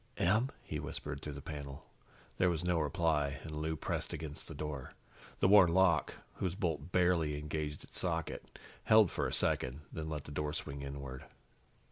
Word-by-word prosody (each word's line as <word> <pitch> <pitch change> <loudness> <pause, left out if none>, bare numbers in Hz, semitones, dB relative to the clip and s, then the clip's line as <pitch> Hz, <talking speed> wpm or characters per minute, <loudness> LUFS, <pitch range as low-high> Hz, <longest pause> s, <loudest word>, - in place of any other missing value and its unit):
"Em?" 110 +9 +3
he - - -4
whispered 70 - -5
through 75 - -5
the 70 - -8
panel. 70 -3 -7 0.5
There 90 - +5
was 85 -1 -1
no 90 -2 +2
reply, 75 -2 +1
and 80 - -6
Lou 80 +1 -1
pressed - - -2
against 75 -2 -6
the 80 - -7
door. 70 -3 -5 0.5
The - - +6
worn 95 -4 +7
lock, 95 -4 +4 0.2
whose 90 -2 -1
bolt 85 -5 -2
barely 85 -5 +3
engaged 75 0 -3
its - - -5
socket, - - -2 0.3
held 110 -4 +7
for - - 0
a - - -3
second, 65 +3 +1
then 80 -1 -4
let 75 -2 -3
the - - -10
door 75 0 -2
swing 70 -1 -4
inward. 70 -2 -6
75 Hz, 175 wpm, -34 LUFS, 70-85 Hz, 0.5 s, worn